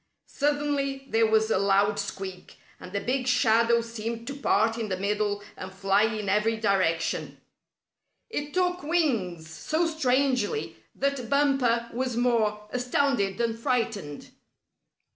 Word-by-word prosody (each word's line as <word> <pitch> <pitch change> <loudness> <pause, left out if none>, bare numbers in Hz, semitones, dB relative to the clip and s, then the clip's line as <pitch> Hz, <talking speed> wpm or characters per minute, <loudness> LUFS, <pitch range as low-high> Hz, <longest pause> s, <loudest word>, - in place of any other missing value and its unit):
Suddenly 285 -2 -1
there 225 0 +4
was 220 0 +2
a - - +3
loud 200 +1 +2
squeak, 190 -2 -6 0.2
and 180 - -10
the 200 - -1
big 255 +3 -1
shadow 235 -1 +3
seemed 230 0 -5
to 280 +2 -5
part 225 -5 +2
in 220 -2 -3
the 185 - -1
middle 205 +1 -1
and 185 - -8
fly 195 +1 +2
in 215 -2 -3
every 210 +3 +2
direction. 185 -6 0 0.9
It 295 -10 -4
took 360 0 0
wings 230 - 0
so 310 - -1
strangely 275 - 0 0.2
that 275 -4 -2
Bumper 270 -5 +2
was 250 -1 -2
more 220 -4 +1
astounded 245 -5 0
than 230 -1 0
frightened. 225 - -2
230 Hz, 130 wpm, -27 LUFS, 205-270 Hz, 0.9 s, there